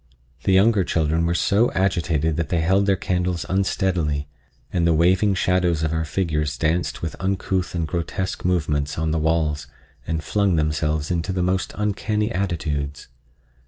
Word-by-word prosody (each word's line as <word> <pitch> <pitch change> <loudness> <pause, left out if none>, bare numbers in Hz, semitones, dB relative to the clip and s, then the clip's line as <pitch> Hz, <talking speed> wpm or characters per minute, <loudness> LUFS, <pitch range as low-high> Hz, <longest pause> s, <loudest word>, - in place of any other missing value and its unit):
The - - +3
younger 100 +1 +4
children 80 0 +1
were 85 - 0
so 105 +7 +2
agitated 85 -5 +1
that 85 -2 -2
they 85 - +1
held 95 +4 +2
their 100 - +4
candles 90 -2 -1
unsteadily, 90 -6 0 0.5
and 85 -2 +2
the 80 - +3
waving 95 +5 +3
shadows 90 -3 +1
of 80 0 0
our 80 0 -1
figures 75 -3 -1
danced 85 +2 -1
with 80 - -3
uncouth 95 -1 -1
and 85 -2 -1
grotesque 90 +3 -3
movements 75 -5 0
on 80 0 0
the 80 - +1
walls 75 -3 0 0.4
and 80 -1 -2
flung 100 +2 +1
themselves 75 0 0
into 85 +2 -1
the 90 -1 -1
most 95 +1 0
uncanny 105 +1 -1
attitudes. 75 -8 -3
85 Hz, 160 wpm, -22 LUFS, 80-95 Hz, 0.5 s, younger